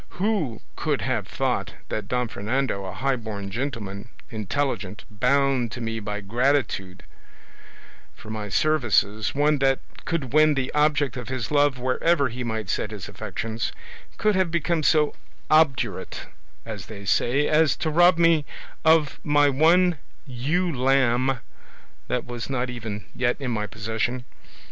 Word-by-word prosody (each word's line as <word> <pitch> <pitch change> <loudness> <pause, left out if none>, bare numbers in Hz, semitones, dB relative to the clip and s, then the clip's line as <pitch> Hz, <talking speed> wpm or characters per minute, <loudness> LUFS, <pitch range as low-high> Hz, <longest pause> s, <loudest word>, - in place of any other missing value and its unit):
Who 180 - 0
could - - -1
have - - -1
thought - - -2
that 110 - -3
Don 125 -1 0
Fernando, 110 -1 -2
a 95 - -5
highborn 110 -4 -3
gentleman, 115 -4 -4 0.2
intelligent, 110 -2 -2
bound 130 +1 +2
to - - -6
me 115 -1 -3
by 105 0 -4
gratitude 105 -4 0 1.1
for 110 - -10
my 105 -1 -4
services, 110 - +2
one 145 +1 +3
that 135 0 +3 0.3
could 140 -7 -2
win 155 0 +5
the 130 -1 -1
object 150 -3 +2
of 125 - -6
his 130 -2 -3
love 145 -2 +3
wherever 135 +4 +2
he 125 +2 -5
might 110 -3 -3
set 105 - -1
his 105 -3 -7
affections, 115 +1 -4 0.5
could 215 0 +2
have 185 -2 +2
become 170 0 0
so 150 0 +3 0.4
obdurate, 130 - +2 0.4
as - - -7
they 100 -2 -9
say, 135 +8 +2
as 155 0 +4
to 160 - -2
rob 175 +2 +5
me 165 -2 +4 0.4
of 160 -2 +4
my 145 -1 +4
one 165 +4 +4 0.3
ewe 150 +7 -1
lamb 130 -1 +2 0.7
that - - -1
was 120 0 -6
not 125 -1 -1
even 110 -4 -6
yet 125 -1 0
in 130 -3 -3
my 105 -2 -1
possession? 110 +4 -3
130 Hz, 145 wpm, -25 LUFS, 110-150 Hz, 1.1 s, win